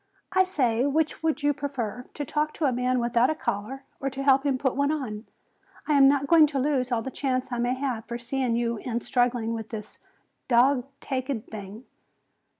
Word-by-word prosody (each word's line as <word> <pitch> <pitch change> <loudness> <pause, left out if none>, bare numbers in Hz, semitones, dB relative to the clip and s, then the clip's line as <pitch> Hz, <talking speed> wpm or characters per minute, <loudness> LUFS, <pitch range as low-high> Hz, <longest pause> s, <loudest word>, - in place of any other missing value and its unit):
"I 375 - +4
say, 255 -8 +1
which 310 +3 0
would 315 -2 0
you 290 0 +3
prefer, 255 -5 -4
to 290 - -3
talk 300 +3 -1
to 315 - -1
a 270 - +3
man 250 +1 0
without 240 0 +2
a 315 - 0
collar 260 +3 -3 0.2
or 275 - -1
to 270 +1 -5
help 275 0 +4
him 270 -2 +1
put 265 -1 0
one 280 +1 +1
on? 240 -8 -4 0.6
I 305 - +2
am 275 -1 +7
not 280 0 +3
going 320 0 +6
to 285 -2 -2
lose 260 -2 0
all 230 -2 0
the 265 - -5
chance 255 -2 -2
I 245 - -2
may 245 +1 +1
have 255 -4 -3
for 235 - -5
seeing 245 0 -1
you 235 -1 0
in 235 +1 -3
struggling 245 -2 0
with 225 -1 -5
this 215 -2 -8 0.5
dog 255 +1 +4
taked 260 -3 -3
thing." 210 +3 -8
255 Hz, 205 wpm, -26 LUFS, 235-280 Hz, 0.6 s, am